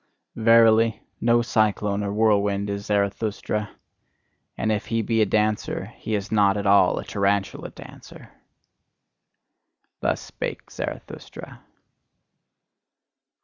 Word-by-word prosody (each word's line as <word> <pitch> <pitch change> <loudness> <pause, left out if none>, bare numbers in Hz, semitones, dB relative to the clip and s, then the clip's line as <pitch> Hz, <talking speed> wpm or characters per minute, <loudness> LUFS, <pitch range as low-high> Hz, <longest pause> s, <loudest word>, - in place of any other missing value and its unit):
Verily, 115 -1 +4 0.2
no 120 0 +3
cyclone 105 -3 0
or 100 - -2
whirlwind 100 -1 +1
is 100 +1 -5
Zarathustra: 105 +1 -1 0.9
and 110 - 0
if 105 -2 -2
he 115 -1 0
be 115 0 +1
a 105 - +3
dancer, 105 +1 -1
he 110 - -3
is 100 +1 -4
not 100 -2 +3
at 100 - -3
all 100 0 +4
a - - -4
tarantula 100 0 -1
dancer! - - -13 1.7
Thus - - 0
spake - - -7
Zarathustra. - - -8
105 Hz, 105 wpm, -24 LUFS, 100-110 Hz, 1.7 s, Verily